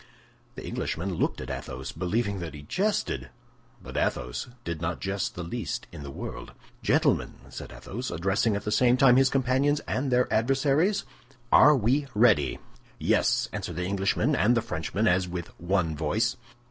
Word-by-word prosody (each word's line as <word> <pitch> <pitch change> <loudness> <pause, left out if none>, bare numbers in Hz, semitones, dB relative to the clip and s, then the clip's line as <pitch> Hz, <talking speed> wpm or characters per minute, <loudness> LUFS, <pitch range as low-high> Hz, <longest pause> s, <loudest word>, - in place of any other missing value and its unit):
The - - -8
Englishman 95 +4 -3
looked - - -1
at - - -6
Athos, 65 +1 -6
believing 100 +2 -1
that 85 -3 -6
he 75 - -9
jested, 130 - -1 0.5
but - - -9
Athos - - -1 0.2
did 85 -2 -4
not 80 - -2
jest 95 0 -2
the 90 - -5
least 85 - -4
in - - -9
the 70 - -7
world. 70 - -7 0.3
"Gentlemen," - - +2
said - - -8
Athos, 95 - -6
addressing 95 +6 +1
at 100 - -3
the 105 - -2
same 125 +2 +4
time 125 -2 +6
his 135 0 +5
companions 135 +3 +2
and 130 0 -2
their 125 0 +4
adversaries, 135 - +2 0.5
"are 150 +3 +8
we 135 +4 +1
ready?" 105 - +4 0.4
"Yes!" - - +2
answered 85 - -4
the 90 +2 -2
Englishmen 100 +8 +1
and 120 +1 +3
the 115 - +1
Frenchmen, 90 +7 -1
as 90 0 +3
with 85 -1 -5
one 85 -2 0
voice. 75 0 0
100 Hz, 165 wpm, -27 LUFS, 85-130 Hz, 0.5 s, are